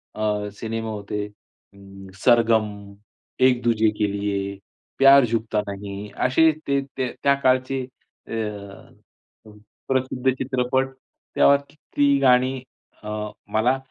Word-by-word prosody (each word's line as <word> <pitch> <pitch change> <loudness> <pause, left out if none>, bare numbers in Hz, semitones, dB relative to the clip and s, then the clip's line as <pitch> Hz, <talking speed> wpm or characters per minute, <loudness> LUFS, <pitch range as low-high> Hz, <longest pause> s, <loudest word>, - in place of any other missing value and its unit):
अ, 105 -1 -1
cinema 115 0 -4
होते 105 0 -4
अं, 100 -1 -17 0.2
सरगम, 115 -3 +4 0.7
एक 130 -1 +4
दूजे 110 -2 +3
के 105 -1 +1
लिये, 100 -1 -3 0.4
प्यार 135 -1 +7
झुकता 110 -1 -1
नही 100 +1 -7 0.2
असे 160 +5 +4 0.2
ते 140 0 +2 0.2
ते 130 -2 -1
त्या 140 - +5
काळचे 130 +1 +2 0.5
अ, - - -7 1.5
प्रसिद्ध 130 0 0
चित्रपट 130 0 -1 0.5
त्यात 140 0 +3
ती 145 -2 +1
गाणी 130 0 +4 0.5
अ, 105 - -6 0.4
मला 120 +5 +2
120 Hz, 110 wpm, -23 LUFS, 105-130 Hz, 1.5 s, प्यार